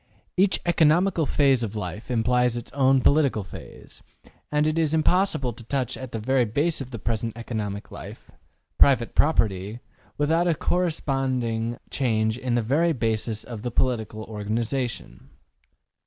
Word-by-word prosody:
Each 190 Hz, +1 st, +3 dB
economical 170 Hz, 0 st, +3 dB
phase 135 Hz, -4 st, +3 dB
of 110 Hz, -2 st, -3 dB
life 105 Hz, +1 st, -5 dB
implies 125 Hz, 0 st, +2 dB
its 120 Hz, -, -7 dB
own 135 Hz, -1 st, +3 dB
political 140 Hz, -7 st, +3 dB
phase; 95 Hz, -, -12 dB, 0.5 s
and 150 Hz, 0 st, +2 dB
it 155 Hz, +1 st, +1 dB
is 160 Hz, -1 st, +2 dB
impossible 160 Hz, -6 st, +1 dB
to 120 Hz, +2 st, -12 dB
touch 130 Hz, +1 st, -2 dB
the 130 Hz, -3 st, -6 dB
very 130 Hz, +4 st, +2 dB
basis 145 Hz, +9 st, 0 dB
of 130 Hz, -, -6 dB
the 120 Hz, -, -6 dB
present 115 Hz, +1 st, -3 dB
economical 105 Hz, -3 st, -5 dB
life -, -, -10 dB, 0.5 s
private 130 Hz, -4 st, +4 dB
property 105 Hz, -, +1 dB, 0.4 s
without 165 Hz, +4 st, +2 dB
a 170 Hz, -, +2 dB
corresponding 130 Hz, -10 st, -1 dB
change 110 Hz, -3 st, 0 dB
in 125 Hz, -2 st, -1 dB
the 120 Hz, -, +1 dB
very 160 Hz, +9 st, +2 dB
basis 115 Hz, -3 st, -1 dB
of 115 Hz, -4 st, -8 dB
the 120 Hz, -, -3 dB
political 110 Hz, -3 st, -1 dB
organization. 110 Hz, -, -4 dB
125 Hz, 140 wpm, -25 LUFS, 110-145 Hz, 0.5 s, private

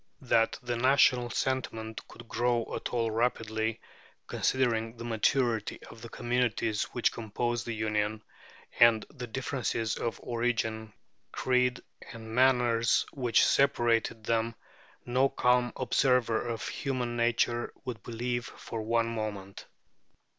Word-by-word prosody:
That 115 Hz, -2 st, +2 dB
the 120 Hz, 0 st, -2 dB
national 125 Hz, -1 st, +4 dB
sentiment 110 Hz, -3 st, -2 dB
could 120 Hz, 0 st, -13 dB
grow 120 Hz, 0 st, 0 dB
at -, -, -4 dB
all 115 Hz, -2 st, 0 dB
rapidly, 110 Hz, -1 st, -1 dB, 0.5 s
considering 115 Hz, -3 st, 0 dB
the 115 Hz, -, -7 dB
maturity 115 Hz, -1 st, 0 dB
of 115 Hz, -, -13 dB
the 115 Hz, -, -8 dB
communities 120 Hz, -3 st, 0 dB
which 120 Hz, -, 0 dB
composed 120 Hz, +2 st, -3 dB
the 115 Hz, -, -2 dB
Union 105 Hz, 0 st, -1 dB, 0.6 s
and 115 Hz, -2 st, +6 dB
the 125 Hz, -4 st, -7 dB
differences 120 Hz, -3 st, -2 dB
of 115 Hz, -, -3 dB
origin, 110 Hz, -2 st, -1 dB, 0.4 s
creed, 125 Hz, -1 st, +1 dB, 0.3 s
and 110 Hz, -1 st, -9 dB
manners 120 Hz, -2 st, +3 dB
which 125 Hz, -4 st, +3 dB
separated 120 Hz, -5 st, +2 dB
them, 115 Hz, +1 st, 0 dB, 0.5 s
no 130 Hz, +3 st, +2 dB
calm 125 Hz, -2 st, +2 dB
observer 125 Hz, -3 st, +2 dB
of 115 Hz, -1 st, -3 dB
human 125 Hz, -3 st, -3 dB
nature 120 Hz, 0 st, +1 dB
would 120 Hz, -4 st, -5 dB
believe 120 Hz, +1 st, -3 dB
for 115 Hz, -, -7 dB
one 115 Hz, +1 st, +1 dB
moment. 105 Hz, -4 st, -5 dB
115 Hz, 120 wpm, -29 LUFS, 110-125 Hz, 0.6 s, and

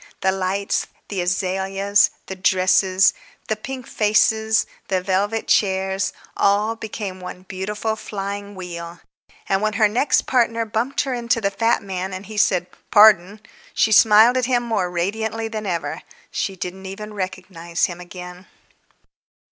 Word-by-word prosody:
The 190 Hz, -, +3 dB
lights, 195 Hz, +1 st, -1 dB, 0.2 s
the 195 Hz, -3 st, -2 dB
azaleas, 195 Hz, +2 st, +1 dB, 0.2 s
the 190 Hz, -, -6 dB
dresses, 185 Hz, +1 st, +3 dB, 0.4 s
the 220 Hz, -, +1 dB
pink 255 Hz, +3 st, -7 dB
faces, 220 Hz, +1 st, +2 dB, 0.2 s
the 190 Hz, -1 st, +1 dB
velvet 200 Hz, +4 st, -1 dB
chairs, 190 Hz, -1 st, +1 dB, 0.2 s
all 205 Hz, +3 st, +2 dB
became 210 Hz, -4 st, -6 dB
one 180 Hz, 0 st, -8 dB
beautiful 210 Hz, +4 st, -3 dB
flying 200 Hz, -1 st, -6 dB
wheel. 175 Hz, -2 st, -7 dB, 0.5 s
And 195 Hz, 0 st, +1 dB
when 215 Hz, 0 st, 0 dB
her 215 Hz, +1 st, +4 dB
next 240 Hz, +7 st, +2 dB
partner 230 Hz, -2 st, +1 dB
bumped 230 Hz, +6 st, -1 dB
her 270 Hz, -, -2 dB
into 235 Hz, -1 st, 0 dB
the 200 Hz, -3 st, 0 dB
fat 225 Hz, +3 st, +1 dB
man 190 Hz, -1 st, -4 dB
and 190 Hz, +2 st, -8 dB
he 215 Hz, -1 st, -9 dB
said, 180 Hz, -3 st, +3 dB, 0.3 s
"Par_don_," 205 Hz, -1 st, +6 dB, 0.3 s
she 220 Hz, -, +3 dB
smiled 220 Hz, +3 st, +6 dB
at 255 Hz, -, +1 dB
him 245 Hz, -1 st, +1 dB
more 215 Hz, -6 st, -1 dB
radiantly 220 Hz, +6 st, -2 dB
than 215 Hz, -2 st, -5 dB
ever. 170 Hz, -2 st, -3 dB, 0.3 s
She 195 Hz, -, -2 dB
didn't 190 Hz, +1 st, -6 dB
even 210 Hz, +2 st, -7 dB
recognize 185 Hz, -3 st, -3 dB
him 175 Hz, 0 st, -6 dB
again. 180 Hz, +1 st, -10 dB
200 Hz, 145 wpm, -21 LUFS, 185-220 Hz, 0.5 s, Par_don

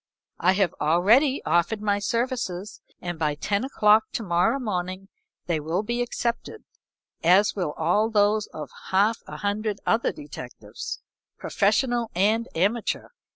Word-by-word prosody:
I 185 Hz, +2 st, +4 dB
have 190 Hz, -3 st, +1 dB
already 215 Hz, -, +3 dB
offered 175 Hz, +6 st, +1 dB
my 205 Hz, -1 st, 0 dB
services, 220 Hz, -3 st, -2 dB, 0.2 s
and 175 Hz, -3 st, -5 dB
by 150 Hz, -2 st, 0 dB
ten 200 Hz, +8 st, -1 dB
o'clock 215 Hz, -5 st, +4 dB
to 230 Hz, -, -2 dB
morrow 175 Hz, +6 st, +2 dB
morning 190 Hz, -5 st, -4 dB, 0.4 s
they 170 Hz, -3 st, 0 dB
will 165 Hz, +6 st, -2 dB
be 240 Hz, +3 st, -2 dB
accepted, 240 Hz, -1 st, -3 dB, 0.6 s
as 185 Hz, +5 st, +4 dB
will 175 Hz, -7 st, -2 dB
also 215 Hz, +2 st, +1 dB
those 210 Hz, 0 st, +2 dB
of 150 Hz, -3 st, -8 dB, 0.2 s
half 205 Hz, +4 st, +3 dB
a -, -, -7 dB
hundred 205 Hz, 0 st, -2 dB
other 225 Hz, +1 st, +2 dB
detectives, 300 Hz, -1 st, -8 dB, 0.4 s
professional 230 Hz, +3 st, +1 dB
and 215 Hz, +5 st, +2 dB
amateur. 205 Hz, +7 st, 0 dB
205 Hz, 135 wpm, -25 LUFS, 180-230 Hz, 0.6 s, I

